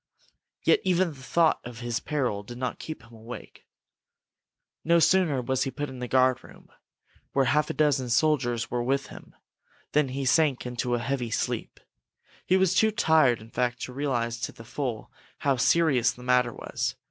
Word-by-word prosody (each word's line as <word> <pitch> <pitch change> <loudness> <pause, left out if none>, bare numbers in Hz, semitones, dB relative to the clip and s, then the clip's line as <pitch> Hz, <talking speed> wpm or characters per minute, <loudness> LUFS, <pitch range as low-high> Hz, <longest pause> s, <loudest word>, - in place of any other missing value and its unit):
Yet 450 - +4
even 185 -1 +2
the 140 -4 -12
thought 165 +4 +2
of 120 0 -9
his 120 -1 -2
peril 130 -9 -2
did 120 +4 -10
not 125 -1 -3
keep 155 -4 -7
him 115 0 -18
awake. 115 +2 -11 1.2
No 170 +1 +4
sooner 165 -6 +3
was 130 +1 -1
he 135 - +1
put 145 +1 -4
in 130 -1 -9
the 125 - -4
guard 130 0 +3
room, - - -16 0.6
where 135 -1 +3
half 150 +4 +2
a - - -1
dozen 140 -5 +1
soldiers 120 -3 +1
were 120 - 0
with 135 +3 -1
him, - - -13 0.6
than 150 -1 +3
he 135 +1 -3
sank 140 -1 +2
into 125 0 -1
a - - -1
heavy 120 0 -2
sleep. - - -3 0.7
He 185 - +4
was 190 -2 +3
too 220 - +4
tired, 160 - +3
in 110 +1 -14
fact, 125 0 -1
to 125 - -6
realize 120 -4 -1
to - - -3
the 115 - -13
full 120 -1 -4 0.3
how 140 -2 +1
serious 140 -2 +3
the 125 - -13
matter 125 -1 +3
was. - - -3
130 Hz, 180 wpm, -27 LUFS, 120-150 Hz, 1.2 s, Yet